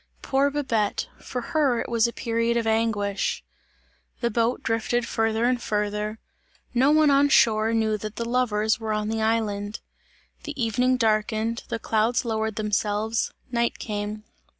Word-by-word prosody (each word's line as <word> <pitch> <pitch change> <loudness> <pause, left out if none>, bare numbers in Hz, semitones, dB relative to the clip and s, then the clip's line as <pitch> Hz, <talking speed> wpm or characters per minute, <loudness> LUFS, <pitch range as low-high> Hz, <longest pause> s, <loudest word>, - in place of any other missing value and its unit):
Poor 275 +1 +2
Babette! 245 -8 -1
For 250 - -5
her 280 -7 +3
it - - -3
was 230 -1 +2
a - - -3
period 230 0 0
of 230 - 0
anguish. 220 - 0 0.8
The 235 -1 0
boat 230 +2 0
drifted 230 +1 0
farther 225 +1 0
and 250 0 +1
farther. 210 0 -2 0.6
No 255 +3 +4
one 305 -1 +5
on 280 +1 +4
shore 220 -4 +4
knew 220 -2 +1
that 215 0 -6
the 235 - -3
lovers 220 -3 +1
were 220 -1 -2
on 210 0 -1
the 225 0 -1
island. 215 -2 -1 0.6
The 295 -2 -7
evening 250 +2 +2
darkened, 220 0 0
the 230 - -1
clouds 225 +2 +1
lowered 220 -1 -1
themselves; 210 +1 0 0.2
night 235 -1 0
came. 210 0 -4
225 Hz, 150 wpm, -25 LUFS, 215-240 Hz, 0.8 s, one